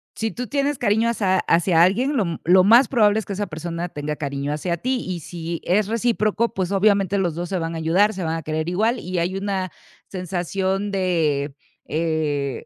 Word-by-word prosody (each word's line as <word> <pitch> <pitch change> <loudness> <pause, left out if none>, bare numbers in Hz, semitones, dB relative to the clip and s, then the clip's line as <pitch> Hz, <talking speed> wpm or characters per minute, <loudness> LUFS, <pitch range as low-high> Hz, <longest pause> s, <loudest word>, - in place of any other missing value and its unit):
si 225 0 -2
tú 250 0 -5
tienes 285 +1 0
cariño 220 0 +2
hacia 195 -5 +1
hacia 165 0 +3
alguien, 250 +11 +2
lo 210 - +2 0.2
lo 180 +2 +5
más 235 +5 +7
probable 215 -4 +3
es 220 - -6
que - - -8
esa 205 +1 -3
persona 170 +1 -4
tenga 150 -1 -4
cariño 140 0 -3
hacia 170 +3 -2
ti. 255 +8 -1
Y 180 -2 -4
si 165 +1 -6
es 195 +3 +2
recíproco, 230 0 0
pues, 185 -1 -2
obviamente 200 -1 +3
los 175 -5 0
2 175 +1 -4
se 190 - -1
van 165 0 -3
a - - -3
ayudar, 180 +7 +2
se 190 - -5
van 160 0 -1
a 165 - -5
querer 155 +1 -2
igual. 220 +7 +1
Y 180 0 -3
hay 175 +3 -1
una 195 -2 -2 0.4
sensación 190 +2 -2
de, 160 -7 0 0.3
eh, 155 -4 -2
185 Hz, 200 wpm, -22 LUFS, 165-210 Hz, 0.4 s, más